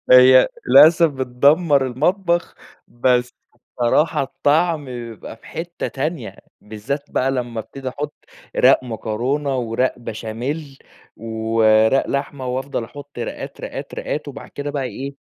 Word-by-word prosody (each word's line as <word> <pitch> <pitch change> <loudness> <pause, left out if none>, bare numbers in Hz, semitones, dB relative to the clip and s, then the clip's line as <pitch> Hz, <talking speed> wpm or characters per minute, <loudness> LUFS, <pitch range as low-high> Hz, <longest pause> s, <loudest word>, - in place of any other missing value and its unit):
هي 130 0 +8 0.2
للأسف 155 +5 +7
بِتْدَمّرالمطبخ، 145 - +1 0.3
بس 125 0 +1 0.2
الصراحة 125 +6 0
الطعم 150 +3 +1
بيبقى 120 -3 -8
في - - -20
حتة 170 +1 -5
تانية، 155 +5 -4 0.2
بالذات 110 +7 -5
بقي 130 +1 +1
لما 120 -3 -3
أَبْتدِي 135 +4 -7
أَحُطّ 145 +3 -5 0.4
رَاق - - +5
مكرونة، 125 +5 -2
ورَاق 120 +2 -1
بشاميل، 125 +6 -5 0.4
ورَاق 110 +2 +2
لحمة 140 -1 -3
وأفضل 130 -1 -3
أحط 145 +2 -12
رَاقَات، 120 - -6
رَاقَات، - - -7
رَاقَات 150 0 -4
وبعد 140 0 -9
كده 145 0 -5
بقي 140 -2 -2
إيه 140 +3 -6
130 Hz, 120 wpm, -20 LUFS, 120-145 Hz, 0.4 s, هي